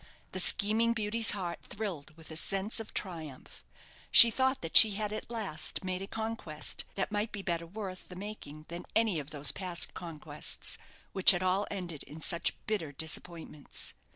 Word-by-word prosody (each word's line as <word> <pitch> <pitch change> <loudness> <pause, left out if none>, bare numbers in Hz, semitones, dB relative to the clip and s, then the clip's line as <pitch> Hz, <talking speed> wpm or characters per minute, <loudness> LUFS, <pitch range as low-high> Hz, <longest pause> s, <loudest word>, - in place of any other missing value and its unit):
The 185 - -3
scheming 220 +5 +4
beauty's 220 0 +2
heart 180 -4 -2
thrilled 170 -8 -7
with 160 0 -9
a - - -7
sense 195 +7 +1
of 225 - -8
triumph. 160 -8 -7 0.5
She 235 -1 +10
thought 260 +2 0
that 165 - -6
she 215 -2 +9
had 210 +1 -3
at 215 - -6
last 205 -7 -1
made 185 0 -4
a 195 - -6
conquest 220 -9 -3
that 195 - -2
might 210 +1 -1
be 200 -2 -7
better 170 -2 -3
worth 190 0 -8
the 180 - -10
making 180 -7 -9
than 170 +1 -7
any 220 -7 +1
of 145 -1 -8
those 145 -2 +2
past 180 -3 +1
conquests, 155 -3 -2 0.3
which 190 - +6
had 180 -1 +4
all 185 +2 0
ended 175 -6 -6
in 155 - -11
such 170 +1 0
bitter 200 -9 -3
disappointments. 160 0 -2
185 Hz, 175 wpm, -30 LUFS, 160-210 Hz, 0.5 s, She